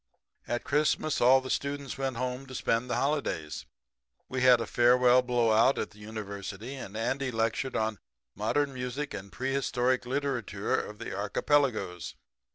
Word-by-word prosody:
"At 120 Hz, -, -2 dB
Christmas 150 Hz, +1 st, +1 dB
all 130 Hz, +2 st, +6 dB
the 130 Hz, -, -5 dB
students 140 Hz, 0 st, -2 dB
went 135 Hz, -3 st, -2 dB
home 130 Hz, +2 st, -3 dB
to 130 Hz, -, -9 dB
spend 115 Hz, +1 st, 0 dB
the -, -, 0 dB
holidays. 135 Hz, -, -2 dB, 0.6 s
We 130 Hz, 0 st, -3 dB
had 125 Hz, -2 st, +7 dB
a 115 Hz, -, -2 dB
farewell 125 Hz, +2 st, +5 dB
blowout 120 Hz, 0 st, +3 dB
at -, -, -3 dB
the 105 Hz, -, -17 dB
University, 105 Hz, +1 st, -6 dB
and 110 Hz, -6 st, -7 dB
Andy 130 Hz, +4 st, -1 dB
lectured 115 Hz, +3 st, -1 dB
on 110 Hz, -2 st, -1 dB, 0.3 s
'Modern 140 Hz, +7 st, 0 dB
Music 130 Hz, +3 st, -4 dB
and 100 Hz, 0 st, -7 dB
Prehistoric 130 Hz, -1 st, 0 dB
Literature 125 Hz, -7 st, -2 dB
of 105 Hz, -, -3 dB
the -, -, -6 dB
Archipelagos.' 105 Hz, -, 0 dB
125 Hz, 150 wpm, -29 LUFS, 110-135 Hz, 0.6 s, had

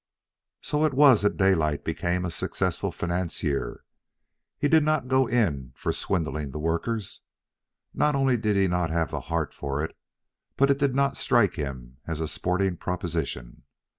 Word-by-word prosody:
So 150 Hz, +1 st, 0 dB
it 155 Hz, -4 st, +1 dB
was 135 Hz, -5 st, +7 dB
that 105 Hz, -, +1 dB
Daylight 80 Hz, -7 st, +2 dB
became 90 Hz, +1 st, -1 dB
a 90 Hz, -, -3 dB
successful -, -, -2 dB
financier. 85 Hz, -5 st, -2 dB, 0.7 s
He 145 Hz, -, +1 dB
did 160 Hz, +2 st, +5 dB
not 155 Hz, -4 st, +1 dB
go 130 Hz, 0 st, +3 dB
in 75 Hz, -, 0 dB
for -, -, -2 dB
swindling 75 Hz, -4 st, -2 dB
the 65 Hz, -, -6 dB
workers. 85 Hz, +7 st, -2 dB, 0.7 s
Not 150 Hz, -1 st, +2 dB
only 135 Hz, -2 st, +3 dB
did 110 Hz, -3 st, 0 dB
he 95 Hz, -1 st, +3 dB
not 90 Hz, -2 st, 0 dB
have 80 Hz, -1 st, 0 dB
the -, -, -3 dB
heart 80 Hz, -4 st, -1 dB
for 70 Hz, +1 st, -3 dB
it, -, -, -10 dB, 0.6 s
but 140 Hz, +1 st, +4 dB
it 140 Hz, -, +1 dB
did 140 Hz, -3 st, +1 dB
not 140 Hz, 0 st, +1 dB
strike -, -, +3 dB
him 65 Hz, -3 st, -6 dB
as 80 Hz, -2 st, -3 dB
a 80 Hz, -, -1 dB
sporting 90 Hz, +4 st, -1 dB
proposition. 85 Hz, -9 st, -4 dB
90 Hz, 165 wpm, -26 LUFS, 80-125 Hz, 0.7 s, was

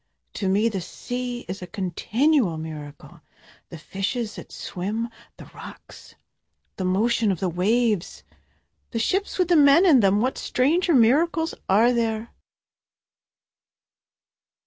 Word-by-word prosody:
To 195 Hz, -, -2 dB
me 205 Hz, +4 st, +2 dB
the 200 Hz, -5 st, -3 dB
sea 245 Hz, +6 st, -5 dB
is 185 Hz, +2 st, -6 dB
a 180 Hz, -, -7 dB
continual 205 Hz, -, 0 dB
miracle, 155 Hz, -2 st, -9 dB, 0.5 s
The 170 Hz, -, -9 dB
fishes 205 Hz, +7 st, -4 dB
that -, -, -11 dB
swim 210 Hz, +6 st, -4 dB, 0.3 s
the -, -, -11 dB
rocks -, -, -13 dB, 0.6 s
the 190 Hz, -, -3 dB
motion 215 Hz, +3 st, +1 dB
of 180 Hz, -, -3 dB
the 190 Hz, -, -1 dB
waves 210 Hz, +2 st, 0 dB, 0.7 s
the 230 Hz, -, -5 dB
ships 385 Hz, -, -1 dB
with 365 Hz, -2 st, +1 dB
the 350 Hz, -, +4 dB
men 295 Hz, +4 st, +6 dB
in 305 Hz, -8 st, +6 dB
them, 200 Hz, -1 st, +3 dB
What 255 Hz, +4 st, -1 dB
stranger 325 Hz, +6 st, +1 dB
miracles 320 Hz, +7 st, +3 dB, 0.2 s
are 225 Hz, +6 st, +4 dB
there? 225 Hz, -1 st, -2 dB
225 Hz, 125 wpm, -24 LUFS, 190-255 Hz, 0.7 s, men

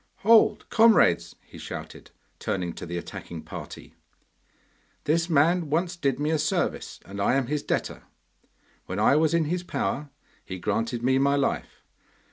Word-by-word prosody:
'Hold, 225 Hz, 0 st, +5 dB
comrades!' 225 Hz, -, +4 dB
he -, -, -13 dB
shouted, -, -, -8 dB, 0.3 s
turning 90 Hz, -3 st, -2 dB
to -, -, -8 dB
the 85 Hz, +1 st, -4 dB
attacking 85 Hz, -1 st, -7 dB
party. 80 Hz, -, -9 dB, 1.1 s
'This 165 Hz, +4 st, +1 dB
man 165 Hz, +2 st, +3 dB
once 170 Hz, +4 st, 0 dB
did 140 Hz, -6 st, -1 dB
me 150 Hz, +2 st, 0 dB
a 160 Hz, -, +1 dB
service, 155 Hz, +1 st, -1 dB
and 100 Hz, +1 st, -6 dB
I 120 Hz, -, +2 dB
am 135 Hz, -2 st, +1 dB
his 150 Hz, +3 st, -2 dB
debtor. -, -, -2 dB, 0.9 s
When -, -, -4 dB
I -, -, +4 dB
was 155 Hz, +1 st, +3 dB
in 165 Hz, -2 st, +2 dB
his 175 Hz, +4 st, -1 dB
power 150 Hz, -4 st, -3 dB, 0.3 s
he 95 Hz, -, -7 dB
granted 115 Hz, +5 st, -2 dB
me 130 Hz, +1 st, +3 dB
my 140 Hz, +1 st, +3 dB
life. 140 Hz, -1 st, -2 dB
145 Hz, 155 wpm, -26 LUFS, 115-165 Hz, 1.1 s, Hold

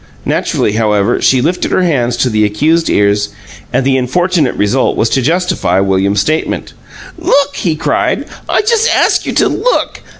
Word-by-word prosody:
Naturally, -, -, 0 dB
however, 105 Hz, 0 st, 0 dB
she 130 Hz, -2 st, +3 dB
lifted 175 Hz, +4 st, -1 dB
her 185 Hz, -, +2 dB
hands 125 Hz, -8 st, 0 dB
to 125 Hz, -, +1 dB
the 110 Hz, 0 st, +1 dB
accused 155 Hz, +11 st, +1 dB
ears, 100 Hz, 0 st, +1 dB, 0.4 s
and 130 Hz, -, 0 dB
the 135 Hz, -1 st, +2 dB
unfortunate 160 Hz, +3 st, 0 dB
result 105 Hz, +6 st, 0 dB
was 110 Hz, -, +1 dB
to 135 Hz, -, +1 dB
justify 165 Hz, -, 0 dB
William's 100 Hz, +1 st, +1 dB
statement. 155 Hz, +7 st, -2 dB, 0.5 s
"LOOK!" 285 Hz, 0 st, +1 dB
he 165 Hz, -4 st, -1 dB
cried. 155 Hz, -, -1 dB, 0.2 s
"I -, -, +2 dB
just 455 Hz, +1 st, +2 dB
ask -, -, +1 dB
you -, -, -2 dB
to -, -, +2 dB
look! -, -, -1 dB
130 Hz, 165 wpm, -13 LUFS, 105-170 Hz, 0.5 s, she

